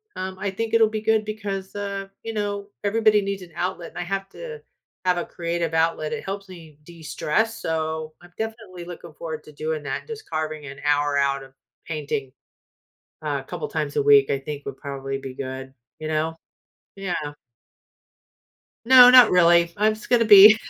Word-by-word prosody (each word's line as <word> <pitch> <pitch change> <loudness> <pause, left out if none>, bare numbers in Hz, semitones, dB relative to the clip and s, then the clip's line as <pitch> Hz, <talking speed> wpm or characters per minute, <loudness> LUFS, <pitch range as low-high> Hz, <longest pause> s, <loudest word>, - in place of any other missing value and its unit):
um, 185 0 -5
I 200 +1 -1
think 225 +3 -4
it'll 225 -1 +5
be 215 0 -3
good 220 0 +2
because, 200 -3 -5
uh, 200 -1 -4
you 225 - -5
know, 205 -1 -3
everybody 215 0 +3
needs 195 -1 -3
an 175 - -14
outlet 180 0 -3
and - - -14
I - - -2
have 195 +2 -3
to 465 - -9 0.4
have 180 -1 +3
a 175 - -2
creative 170 -1 -3
outlet, 160 -1 +1
it - - -4
helps 195 0 -5
me 165 -5 -12
de-stress, 170 +7 -2
so, 160 -1 -3
I'm 175 0 -17
definitely 220 -6 -6
looking 170 -2 -10
forward 160 -1 -6
to - - -12
doing 155 +1 -3
that, 135 -2 -4
just 445 -1 -8
carving 155 -1 -3
an 140 0 -9
hour 145 -1 +2
out 140 -1 +1
of 135 0 -15 0.3
painting, 145 -4 -4 0.9
uh, - - -2
couple 455 - -5
times - - -3
a 435 - +2
week, 425 -1 +6
I 140 - 0
think 145 +1 -7
would 135 -1 -6
probably 135 -1 -5
be 135 -1 -7
good, 130 0 -6 0.3
you 155 - -5
know? 155 +1 -1 0.6
Yeah. 175 -7 -3 1.5
No, 250 0 +10
not 250 -3 +9
really, 170 -1 +5
I'm 215 +1 +3
just 215 - -12
gonna 235 -1 +4
be 210 0 +10
175 Hz, 180 wpm, -24 LUFS, 155-210 Hz, 1.5 s, No